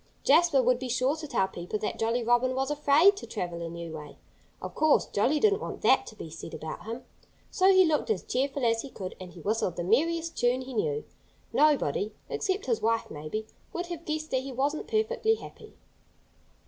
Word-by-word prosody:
Jasper 335 Hz, -7 st, +5 dB
would 250 Hz, 0 st, +3 dB
be 255 Hz, -1 st, -5 dB
sure 255 Hz, +4 st, +1 dB
to 310 Hz, -1 st, -6 dB
tell 190 Hz, -8 st, +1 dB
people 180 Hz, +2 st, -5 dB
that 210 Hz, -, -4 dB
Jolly 230 Hz, +2 st, +1 dB
Robin 240 Hz, +2 st, +2 dB
was 270 Hz, +2 st, -1 dB
afraid 295 Hz, +6 st, +5 dB
to -, -, -8 dB
travel 175 Hz, -5 st, -4 dB
a 165 Hz, -, -4 dB
new 170 Hz, 0 st, -7 dB
way.... 150 Hz, -2 st, -10 dB, 0.4 s
Of -, -, -7 dB
course, 310 Hz, -1 st, +3 dB
Jolly 265 Hz, +9 st, +1 dB
didn't 425 Hz, +3 st, +3 dB
want -, -, -6 dB
that -, -, +4 dB
to 220 Hz, -, -10 dB
be 165 Hz, -6 st, -8 dB
said 165 Hz, 0 st, -8 dB
about 160 Hz, +4 st, -7 dB
him. 230 Hz, +3 st, -6 dB, 0.5 s
So 380 Hz, +1 st, +5 dB
he 375 Hz, -1 st, +6 dB
looked 310 Hz, -3 st, +1 dB
as 210 Hz, -5 st, 0 dB
cheerful 270 Hz, 0 st, -1 dB
as 230 Hz, -1 st, +2 dB
he 275 Hz, -, -8 dB
could; 190 Hz, -7 st, -7 dB
and 185 Hz, -1 st, -9 dB
he 175 Hz, -, -11 dB
whistled 205 Hz, -2 st, 0 dB
the 175 Hz, -, -3 dB
merriest 325 Hz, -, +1 dB
tune 245 Hz, +1 st, +2 dB
he 260 Hz, 0 st, -8 dB
knew. 445 Hz, +1 st, -1 dB, 0.5 s
Nobody 220 Hz, -, +2 dB
except 390 Hz, +3 st, -1 dB
his 465 Hz, -, 0 dB
wife, 225 Hz, 0 st, 0 dB
maybe 155 Hz, +9 st, -5 dB, 0.3 s
would 350 Hz, -, -3 dB
have 335 Hz, -1 st, -6 dB
guessed 310 Hz, 0 st, -3 dB
that 260 Hz, -, +1 dB
he 270 Hz, +1 st, -7 dB
wasn't 280 Hz, +4 st, -1 dB
perfectly 445 Hz, +1 st, +1 dB
happy. -, -, -12 dB
255 Hz, 205 wpm, -28 LUFS, 215-315 Hz, 0.5 s, he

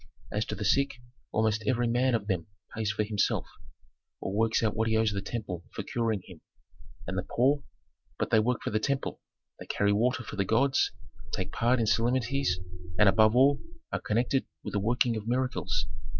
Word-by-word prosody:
As 105 Hz, +2 st, 0 dB
to -, -, -4 dB
the 105 Hz, -, -4 dB
sick, 140 Hz, +6 st, +2 dB, 0.4 s
almost 110 Hz, 0 st, +1 dB
every 120 Hz, 0 st, +2 dB
man 125 Hz, +1 st, +2 dB
of 105 Hz, -3 st, -2 dB
them 95 Hz, -5 st, -1 dB, 0.3 s
pays 110 Hz, -2 st, 0 dB
for 105 Hz, +1 st, 0 dB
himself, 105 Hz, -1 st, 0 dB, 0.7 s
or 95 Hz, -, -4 dB
works 115 Hz, +2 st, +2 dB
out 110 Hz, -2 st, +1 dB
what 110 Hz, +1 st, +1 dB
he 110 Hz, 0 st, +2 dB
owes 110 Hz, -1 st, +3 dB
the 100 Hz, -1 st, -2 dB
temple 100 Hz, -5 st, -5 dB
for -, -, -3 dB
curing 115 Hz, -5 st, -1 dB
him. 90 Hz, -5 st, -13 dB, 0.6 s
And -, -, -2 dB
the -, -, -5 dB
poor? 140 Hz, +4 st, +3 dB, 0.6 s
But -, -, -2 dB
they 110 Hz, -, +6 dB
work 120 Hz, +3 st, 0 dB
for -, -, -2 dB
the 110 Hz, -, +1 dB
temple: 140 Hz, +4 st, -2 dB, 0.4 s
they -, -, -9 dB
carry 100 Hz, 0 st, +2 dB
water 120 Hz, +3 st, +1 dB
for 105 Hz, -, -8 dB
the 100 Hz, -, +2 dB
gods, 130 Hz, +7 st, +2 dB, 0.4 s
take 95 Hz, -1 st, -3 dB
part 120 Hz, +2 st, +2 dB
in 115 Hz, -, +2 dB
solemnities, 120 Hz, 0 st, +1 dB, 0.4 s
and, 105 Hz, -, +6 dB
above 110 Hz, +3 st, +5 dB
all, 140 Hz, +2 st, +5 dB, 0.3 s
are -, -, -1 dB
connected 120 Hz, +5 st, +1 dB, 0.2 s
with -, -, -5 dB
the 105 Hz, -, +1 dB
working 120 Hz, +3 st, +2 dB
of 110 Hz, 0 st, -6 dB
miracles. 120 Hz, -4 st, 0 dB
110 Hz, 195 wpm, -29 LUFS, 105-125 Hz, 0.7 s, they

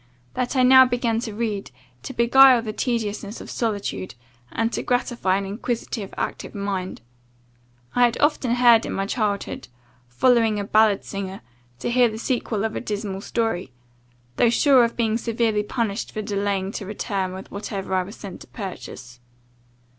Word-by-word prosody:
that 250 Hz, +1 st, -2 dB
I 255 Hz, -, +4 dB
now 260 Hz, +1 st, +9 dB
began 240 Hz, -3 st, 0 dB
to 225 Hz, -3 st, -5 dB
read, 210 Hz, -3 st, -3 dB, 0.3 s
to 130 Hz, -, -7 dB
beguile 250 Hz, +1 st, +6 dB
the 215 Hz, -2 st, -4 dB
tediousness 215 Hz, -3 st, -2 dB
of -, -, -9 dB
solitude, 205 Hz, -, -3 dB, 0.4 s
and 225 Hz, +1 st, -1 dB
to -, -, -1 dB
gratify 240 Hz, -6 st, 0 dB
an 200 Hz, -, -3 dB
inquisitive, 215 Hz, 0 st, -4 dB
active -, -, -4 dB
mind. 195 Hz, -2 st, -3 dB, 0.9 s
I 245 Hz, -, +5 dB
had 235 Hz, -, -1 dB
often, 280 Hz, -5 st, +2 dB, 0.3 s
in -, -, -4 dB
my 195 Hz, -, -1 dB
childhood, 205 Hz, -2 st, -2 dB, 0.4 s
followed 225 Hz, -, +3 dB
a 205 Hz, -, -2 dB
ballad 215 Hz, 0 st, +3 dB
singer, 195 Hz, -1 st, -5 dB, 0.4 s
to 130 Hz, -, -3 dB
hear 245 Hz, -1 st, +4 dB
the 220 Hz, -, -6 dB
sequel 225 Hz, -3 st, -1 dB
of 220 Hz, -, -3 dB
a -, -, -3 dB
dismal 205 Hz, -4 st, -4 dB
story, 200 Hz, -, -2 dB, 0.6 s
though 240 Hz, -, +4 dB
sure 260 Hz, +1 st, +5 dB
of 235 Hz, -, -1 dB
being 225 Hz, -1 st, +1 dB
severely 230 Hz, -2 st, 0 dB
punished 215 Hz, 0 st, -3 dB
for 215 Hz, -, -3 dB
delaying 200 Hz, -1 st, -1 dB
to 205 Hz, -, -6 dB
return 195 Hz, -3 st, -3 dB
with 190 Hz, +1 st, -9 dB
whatever 200 Hz, -2 st, -5 dB
I 185 Hz, -, +3 dB
was 195 Hz, +4 st, -8 dB
sent 195 Hz, -3 st, -9 dB
to -, -, -12 dB
purchase. 130 Hz, -, -8 dB
215 Hz, 160 wpm, -23 LUFS, 200-235 Hz, 0.9 s, now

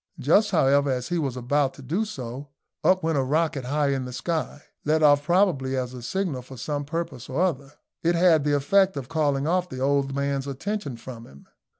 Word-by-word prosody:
Just, 200 Hz, -, +3 dB
however, 140 Hz, -5 st, +3 dB
as 125 Hz, -1 st, -2 dB
he 175 Hz, -, 0 dB
was 135 Hz, -5 st, -2 dB
about 135 Hz, +2 st, 0 dB
to 140 Hz, -, -12 dB
do 175 Hz, -, -1 dB
so 130 Hz, -, -7 dB, 0.4 s
up 185 Hz, 0 st, +3 dB
went 160 Hz, -3 st, +1 dB
a -, -, +1 dB
rocket 150 Hz, 0 st, 0 dB
high 145 Hz, +2 st, +1 dB
into 135 Hz, -2 st, -1 dB
the 125 Hz, -, -7 dB
sky, 155 Hz, +3 st, -3 dB, 0.2 s
let 155 Hz, +1 st, +2 dB
off 145 Hz, -1 st, +6 dB
probably 155 Hz, -7 st, +2 dB
as 125 Hz, -1 st, -3 dB
a 125 Hz, -, -8 dB
signal 160 Hz, 0 st, -2 dB
for 130 Hz, +1 st, -12 dB
some 145 Hz, +4 st, -3 dB
purpose 150 Hz, -5 st, -5 dB
or 135 Hz, +4 st, -2 dB
other. 145 Hz, -6 st, -1 dB, 0.3 s
It 170 Hz, +1 st, +2 dB
had 170 Hz, -3 st, +4 dB
the 145 Hz, 0 st, +2 dB
effect 190 Hz, +6 st, +3 dB
of 135 Hz, -2 st, -6 dB
calling 145 Hz, -3 st, 0 dB
off 180 Hz, +2 st, 0 dB
the 130 Hz, -, -7 dB
old 135 Hz, 0 st, +1 dB
man's 140 Hz, -1 st, -1 dB
attention 140 Hz, -, -4 dB
from 115 Hz, -1 st, -10 dB
him. 70 Hz, +1 st, -17 dB
140 Hz, 210 wpm, -25 LUFS, 130-165 Hz, 0.4 s, off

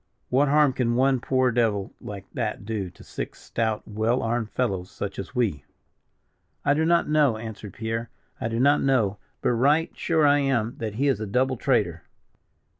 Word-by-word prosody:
What 135 Hz, +3 st, +3 dB
harm 145 Hz, -1 st, +4 dB
can 120 Hz, -2 st, 0 dB
one 130 Hz, +1 st, +3 dB
poor 130 Hz, 0 st, +2 dB
devil 110 Hz, -5 st, 0 dB
like 100 Hz, -2 st, -7 dB
that -, -, -3 dB
do 105 Hz, -4 st, -3 dB
to 85 Hz, -, -16 dB
six -, -, -6 dB
stout, 110 Hz, -2 st, -2 dB
well 110 Hz, +4 st, 0 dB
armed 115 Hz, -1 st, -1 dB
fellows, 95 Hz, -8 st, -2 dB
such 100 Hz, -1 st, -5 dB
as 100 Hz, -, -7 dB
we?" 100 Hz, -, 0 dB, 1.0 s
"I 145 Hz, -, +4 dB
do 160 Hz, +2 st, +1 dB
not 170 Hz, +1 st, +3 dB
know," 150 Hz, -7 st, +3 dB
answered 110 Hz, -3 st, -8 dB
Pierre, 115 Hz, +1 st, -3 dB, 0.3 s
"I -, -, -1 dB
do 115 Hz, 0 st, -2 dB
not 140 Hz, +3 st, +4 dB
know; 110 Hz, -7 st, +2 dB, 0.2 s
but -, -, +3 dB
right 145 Hz, +7 st, +3 dB
sure 160 Hz, -3 st, +2 dB
I 145 Hz, 0 st, +5 dB
am, 120 Hz, -5 st, 0 dB
that 110 Hz, -2 st, -4 dB
he 140 Hz, +5 st, +1 dB
is 135 Hz, -7 st, +2 dB
a 110 Hz, -, -4 dB
double 130 Hz, +5 st, +1 dB
traitor." 105 Hz, -, +1 dB
120 Hz, 185 wpm, -25 LUFS, 110-135 Hz, 1.0 s, I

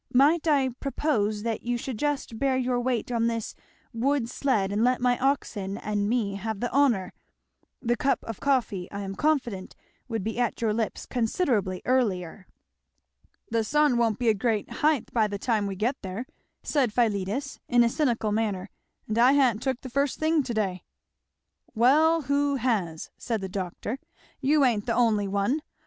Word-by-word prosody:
Might 305 Hz, +6 st, +4 dB
I 280 Hz, -4 st, +3 dB
propose 220 Hz, -8 st, -1 dB
that 230 Hz, -2 st, -2 dB
you 240 Hz, 0 st, -1 dB
should 240 Hz, -2 st, -5 dB
just 285 Hz, -6 st, -2 dB
bear 270 Hz, -1 st, +2 dB
your 250 Hz, -1 st, 0 dB
weight 245 Hz, -1 st, -1 dB
on 230 Hz, -1 st, +1 dB
this 230 Hz, -2 st, -3 dB, 0.4 s
wood 255 Hz, +1 st, +1 dB
sled 215 Hz, -9 st, 0 dB
and 210 Hz, +2 st, +1 dB
let 250 Hz, +1 st, +3 dB
my 245 Hz, 0 st, +3 dB
oxen 215 Hz, -7 st, -1 dB
and 205 Hz, -1 st, -1 dB
me 215 Hz, -5 st, 0 dB
have 220 Hz, 0 st, -4 dB
the 245 Hz, -, -2 dB
honour 245 Hz, -10 st, +2 dB, 0.7 s
The 240 Hz, +1 st, +2 dB
cup 275 Hz, +2 st, 0 dB
of 225 Hz, -3 st, -6 dB
coffee, 235 Hz, -10 st, 0 dB
I 200 Hz, -, -5 dB
am 195 Hz, -1 st, -4 dB
confident, 240 Hz, -7 st, -1 dB, 0.3 s
would 225 Hz, -5 st, -3 dB
be 220 Hz, +3 st, -3 dB
at 240 Hz, -, 0 dB
your 225 Hz, -2 st, +1 dB
lips 220 Hz, 0 st, -2 dB
considerably 225 Hz, -, 0 dB
earlier 200 Hz, -8 st, 0 dB, 0.5 s
" -, -, -41 dB
"The 230 Hz, -1 st, +2 dB
sun 295 Hz, +3 st, +3 dB
won't 230 Hz, -3 st, +2 dB
be 240 Hz, -2 st, +1 dB
a -, -, +5 dB
great 215 Hz, +1 st, -1 dB
haighth 300 Hz, -5 st, +1 dB
by 220 Hz, -3 st, +3 dB
the 205 Hz, -1 st, -4 dB
time 215 Hz, -1 st, 0 dB
we 195 Hz, -, -4 dB
get 225 Hz, +8 st, 0 dB
there," 195 Hz, +5 st, -5 dB, 0.4 s
said 270 Hz, -7 st, +1 dB
Philetus 220 Hz, +4 st, -1 dB
in 240 Hz, 0 st, +5 dB
a -, -, +4 dB
cynical 235 Hz, -4 st, 0 dB
manner; 205 Hz, -3 st, -1 dB, 0.4 s
"and 215 Hz, +2 st, -1 dB
I 250 Hz, +3 st, +6 dB
ha'n't 250 Hz, -6 st, +3 dB
took 260 Hz, -2 st, -2 dB
the -, -, -7 dB
first 280 Hz, +1 st, 0 dB
thing 315 Hz, 0 st, +2 dB
to 255 Hz, -3 st, -4 dB
day!" 190 Hz, -4 st, -1 dB, 0.9 s
"Well 310 Hz, +8 st, +4 dB
who 280 Hz, +1 st, +1 dB
has?" 210 Hz, -11 st, -1 dB
said 230 Hz, -3 st, -2 dB
the 190 Hz, -1 st, -5 dB
doctor; 195 Hz, +6 st, -4 dB, 0.4 s
"you 285 Hz, +1 st, +3 dB
ain't 225 Hz, -4 st, +1 dB
the 230 Hz, -, +1 dB
only 220 Hz, -4 st, +2 dB
one. 200 Hz, +10 st, 0 dB
235 Hz, 180 wpm, -26 LUFS, 205-265 Hz, 0.9 s, I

